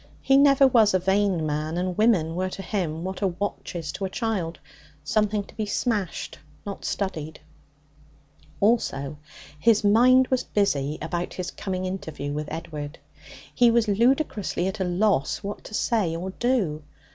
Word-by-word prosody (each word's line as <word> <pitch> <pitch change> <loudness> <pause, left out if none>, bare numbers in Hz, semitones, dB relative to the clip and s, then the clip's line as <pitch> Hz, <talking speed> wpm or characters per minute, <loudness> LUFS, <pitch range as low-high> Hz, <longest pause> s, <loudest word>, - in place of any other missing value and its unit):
He 270 - +4
never 275 0 +6
was 225 -6 +5
a - - +4
vain 190 -2 +1
man, 155 +2 -2
and 180 0 -1
women 195 -7 +3
were 185 +2 -1
to 195 - -7
him 170 -6 -2
what 190 +2 -5
a 195 - +3
watch 190 +1 -4
is 165 -3 -4
to 195 - -4
a - - -3
child 190 -6 -2 0.5
something 210 +6 +1
to - - -17
be 215 -1 -3
smashed, 205 -4 -2 0.3
not 200 -1 -6
studied. 160 -6 -3 1.2
Also, 155 -10 +1 0.4
his 215 +6 +4
mind 250 +5 +5
was 260 -1 +1
busy 150 -8 0
about 175 +2 -3
his 180 -1 -4
coming 185 -2 -4
interview 160 -6 -4
with 150 0 -4
Edward. 155 -2 -6 0.6
He 245 -2 +5
was 230 -1 +3
ludicrously 220 - +1
at 190 +2 -3
a - - +1
loss 180 -5 +1
what 200 +1 -5
to 215 - -7
say 210 -10 +1
or 185 +3 -4
do. 200 -10 0
190 Hz, 160 wpm, -25 LUFS, 165-215 Hz, 1.2 s, never